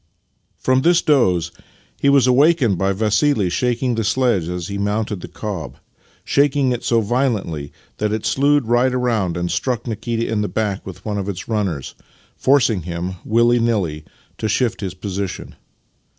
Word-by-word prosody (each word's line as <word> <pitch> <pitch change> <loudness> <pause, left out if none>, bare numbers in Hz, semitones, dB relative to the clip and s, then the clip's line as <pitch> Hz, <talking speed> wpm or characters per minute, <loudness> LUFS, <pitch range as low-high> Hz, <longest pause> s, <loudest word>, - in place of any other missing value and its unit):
From 130 0 +2
this 170 +3 +4
doze 90 - +2 0.5
he 140 - +3
was 140 -2 +5
awakened 130 - +4
by 95 0 +1
Vassili 105 - +1
shaking 125 +4 0
the 115 -1 -1
sledge 110 -7 +1
as 90 -1 -4
he 100 0 -4
mounted 105 -1 -1
the - - -7
cob 100 -8 -6 0.3
— - - -35 0.2
shaking 140 -2 +2
it 120 - -3
so 115 -1 +2
violently 105 - -1 0.3
that 105 0 -1
it 110 0 -2
slewed 145 0 +2
right 120 +3 +2
round 115 -9 0
and 85 0 -2
struck 125 -3 -1
Nikita 115 0 -2
in 110 -2 -1
the 105 - -1
back 105 -3 -2
with 95 - -10
one 105 -2 -2
of 100 0 -3
its 95 -2 -6
runners, 100 - -2 0.4
forcing 125 -8 +3
him, 85 +2 -5
willy 120 +2 +3
nilly, 95 -10 0 0.4
to 110 - -1
shift 120 +2 0
his 95 -2 -4
position. 95 0 -5
110 Hz, 165 wpm, -20 LUFS, 95-125 Hz, 0.5 s, was